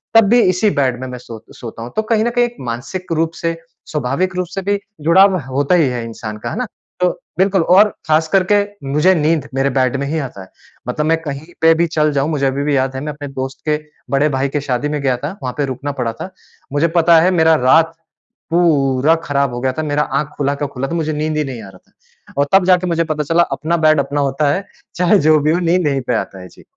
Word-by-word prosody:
तब 225 -1 +7
भी 240 +2 +5
इसी 185 +2 +2
बेड 130 -3 +1
में 130 - -4
मैं 125 0 -7
सो 115 -2 -11
सोता 115 -1 -8
हूँ। 120 - -8
तो 220 - +2
कहीं 220 0 +1
न - - +2
कहीं 245 0 +2
एक 240 0 -7
मानसिक 130 +10 -5
रूप 165 0 0
से, 165 0 -1 0.3
स्वाभाविक 150 +6 -1
रूप 180 -1 -1
से 195 - -2
भी 200 +1 0 0.2
जुड़ाव 190 +5 +5
होता 140 +6 +1
ही 165 -5 +4
है 120 -2 -3
इंसान 110 -2 -7
का, 105 - -5
है - - -5
ना? 250 0 -2 0.3
तो 180 - +3 0.3
बिल्कुल, 190 0 +3
और 195 +5 +5 0.2
खास 155 +1 +3
करके 200 +2 +3 0.3
मुझे 150 +6 +4
नींद 155 -1 +1
मेरे 135 +1 +1
बेड 130 -1 +1
में 140 - -2
ही 160 +3 -1
आता 125 -9 -6
है। 95 - -13 0.4
मतलब 150 +5 -1
मैं 165 +1 +2
कहीं 145 -1 -6 0.2
पे 165 0 +6
भी 170 +1 +1
चल 155 -2 +1
जाऊँ, 140 +2 0
मुझे 145 -3 0
अभी 135 +1 -1
भी 145 0 +1
याद 130 0 -1
है 130 - -4
मैं 150 +1 -4
अपने 145 0 -8
दोस्त 135 -1 -6
के 150 - +2 0.3
बड़े 140 +2 +2
भाई 135 0 -1
के 145 +1 -2
शादी 140 +1 -2
में 150 -1 -2
गया 130 -3 +1
था, 145 +9 -6
वहाँ 125 - -3
पे 145 - +1
रुकना 140 +2 -4
पड़ा 115 -2 -1
था। 190 - -6 0.4
मुझे 145 +3 +2
पता 170 0 +6
है 185 +3 +3
मेरा 160 -2 +4
रात 165 +5 +4 0.6
पूरा 150 -3 +3
खराब 140 -4 0
हो 120 - -4
गया 130 0 +1
था। 155 - -1
मेरा 150 -1 0 0.2
आँख 150 - -2
खुला 140 0 0
का 145 - -3
खुला 135 +1 -4
था, 165 - -5
मुझे 155 -2 -1
नींद 155 +1 -2
ही 150 - +1
नहीं 130 -4 -6
आ 100 - -10
रहा - - -15
था। - - -25
और 145 - +1
तब 190 -1 +5
जाके 180 0 +3
मुझे 170 -1 +1
पता 155 -2 -2
चला 165 +4 +3
अपना 165 +3 -1
बेड 155 -1 +4
अपना 145 +1 -1
होता 140 +1 +1
है। 195 +4 -3 0.3
चाहे 180 +3 +3
जो 155 -1 +4
भी 150 +1 +1
हो 170 - +1
नींद 175 -1 +1
यहीं 135 -2 0
पे 125 - +1
आता 95 - -4
है। 90 - -10
जी। - - -18
150 Hz, 255 wpm, -17 LUFS, 135-170 Hz, 0.6 s, तब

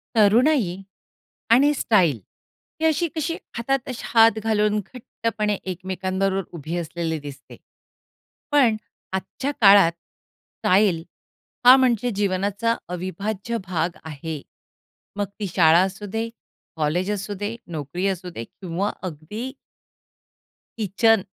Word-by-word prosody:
तरुणाई 220 - +4 0.8
आणि 280 +5 +6
स्टाईल 185 - +2 0.6
ही - - +2
अशी-कशी 320 0 0 0.2
हातात 265 +3 -1
असे 255 - -5
हात 225 -1 +5
घालून 210 -1 +2
घट्टपणे 215 0 -3
एकमेकांबरोबर 190 +1 -2
उभी 160 +3 -4
असलेली 165 -1 -3
दिसते. 140 -1 -11 0.9
पण 265 -7 +4 0.4
आजच्या 190 +8 -3
काळात 195 -4 +7
स्टाईल 180 +1 -1 0.6
हा 255 +1 +11
म्हणजे 245 -2 +2
जीवनाचा 200 +3 0
अविभाज्य 195 +5 -3
भाग 175 -1 -1
आहे. 155 -1 -6 0.7
मग 205 -1 0
ती 205 - -1
शाळा 165 -1 +6
असू 195 +2 -3
दे, 225 +3 -3 0.5
कॉलेज 160 +5 0
असू 205 0 -3
दे, 205 +4 -4
नोकरी 165 +3 -4
असू 185 -1 -3
दे 115 -9 -6
किंवा 185 - -3 0.2
अगदी 210 - -7 1.3
किचन, 220 +1 +3
200 Hz, 105 wpm, -23 LUFS, 175-225 Hz, 1.3 s, हा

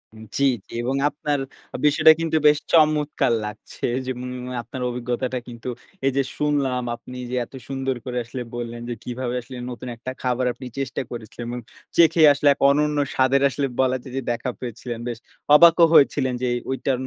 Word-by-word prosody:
উম 110 - -11
জি, 140 - +1 0.3
জি - - -12
এবং 130 +3 -1
আপনার 145 -1 -2 0.5
বিষয়টা 155 +2 +7
কিন্তু 165 -1 +1
বেশ 150 0 +6 0.2
চমৎকার 150 -5 +3
লাগছে। 105 0 -6 0.2
যেমন 125 0 -4 0.3
আপনার 125 +2 -8
অভিজ্ঞতাটা 125 +1 -2
কিন্তু 120 +1 -7 0.4
এইযে 135 0 +2
শুনলাম 140 -4 0
আপনি 125 +1 -11
যে - - -1
এত - - -28
সুন্দর 135 -1 -2
করে 125 -1 -4
আসলে 125 +1 -5
বললেন। 120 0 -5
যে - - -1
কিভাবে 125 0 -3
আসলে 125 +1 -10
নতুন 125 +1 -7
একটা 130 +3 -6
খাবার 125 0 0
আপনি 130 - -10
চেষ্টা 135 - -2
করেছিলেন 120 0 -7
এবং 125 0 -4 0.4
চেখে 165 -1 +5
আসলে 145 +1 0
এক - - -20
অনন্য 150 +1 +2 0.2
স্বাদের 130 +1 +3
আসলে 140 +2 -1
বলা 130 0 +3
যায় 130 - -10
যে - - 0
দেখা 125 +2 -2
পেয়েছিলেন। 120 -1 -6
বেশ 120 -2 -3 0.4
অবাকও 170 +1 +8
হয়েছিলেন 135 -3 +4
যে 125 - 0
এ - - 0
ঐটা 135 0 0
130 Hz, 175 wpm, -23 LUFS, 125-145 Hz, 0.5 s, অবাকও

